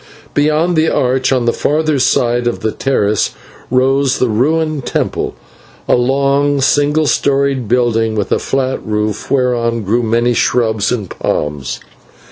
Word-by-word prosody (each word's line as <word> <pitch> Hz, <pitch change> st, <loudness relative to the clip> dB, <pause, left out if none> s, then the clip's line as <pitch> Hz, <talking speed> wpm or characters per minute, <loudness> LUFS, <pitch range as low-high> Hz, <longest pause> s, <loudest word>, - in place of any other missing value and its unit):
Beyond 155 Hz, +4 st, +1 dB
the 160 Hz, +1 st, +3 dB
arch, 130 Hz, +1 st, +1 dB
on 125 Hz, -3 st, +1 dB
the 120 Hz, -, +2 dB
further 155 Hz, -1 st, 0 dB
side 120 Hz, -1 st, +1 dB
of 120 Hz, -, -2 dB
the 110 Hz, -, -1 dB
terrace, 105 Hz, -6 st, 0 dB, 0.3 s
rose 135 Hz, +2 st, +2 dB
the 125 Hz, -, +1 dB
ruined 155 Hz, +5 st, 0 dB
temple, -, -, -2 dB, 0.5 s
a -, -, +3 dB
long 140 Hz, +3 st, +1 dB
single 145 Hz, +3 st, +2 dB
storied 140 Hz, -3 st, +1 dB
building 115 Hz, -2 st, +1 dB
with 105 Hz, -3 st, -2 dB
a -, -, +2 dB
flat 130 Hz, -1 st, -1 dB
roof 105 Hz, -1 st, -3 dB
whereon 120 Hz, -4 st, 0 dB
grew 110 Hz, +5 st, +1 dB
many 120 Hz, +1 st, +1 dB
shrubs 110 Hz, -2 st, +1 dB
and 110 Hz, -6 st, -2 dB
palms. 75 Hz, -4 st, -3 dB
125 Hz, 140 wpm, -15 LUFS, 115-140 Hz, 0.5 s, the